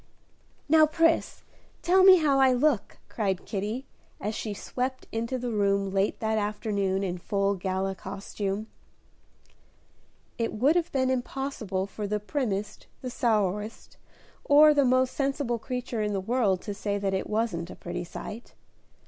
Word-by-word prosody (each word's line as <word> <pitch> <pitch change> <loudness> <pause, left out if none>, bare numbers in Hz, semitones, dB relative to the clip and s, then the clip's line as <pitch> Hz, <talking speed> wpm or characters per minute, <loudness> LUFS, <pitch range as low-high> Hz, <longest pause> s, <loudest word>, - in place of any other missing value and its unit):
"Now, 310 0 +6
Pris, 330 +1 +1 0.4
tell 370 +2 +5
me 380 0 +10
how 290 -5 +3
I 265 -1 +5
look," 250 -4 +1
cried 195 -4 -2
Kitty, 215 +6 -3 0.3
as 210 +2 -3
she 215 - -4
swept 255 +5 -4
into 230 +3 -2
the 245 -1 -3
room 200 -2 +1
late 195 +1 0
that 220 0 +1
afternoon 205 -2 -1
in 180 -2 -3
full 200 +2 0
gala 190 0 -2
costume. 195 +1 -4 1.7
It 230 - -1
would 265 +9 +3
have 350 0 0
been 260 -1 +1
impossible 245 -7 -2
for 205 +1 -5
the 210 +1 -1
primmest, 210 -3 -3 0.2
the 255 - -4
sourest, 210 -3 -1 0.5
or 300 +1 +7
the 285 -2 +3
most 255 0 +3
sensible 275 -4 -1
creature 250 -1 -4
in 210 -1 -1
the 195 - 0
world 200 -2 +1
to 205 - -4
say 205 0 -2
that 195 -1 -1
it 190 - -2
wasn't 210 -6 -1
a - - -8
pretty 175 0 -5
sight. 210 +6 -8
215 Hz, 150 wpm, -27 LUFS, 200-260 Hz, 1.7 s, me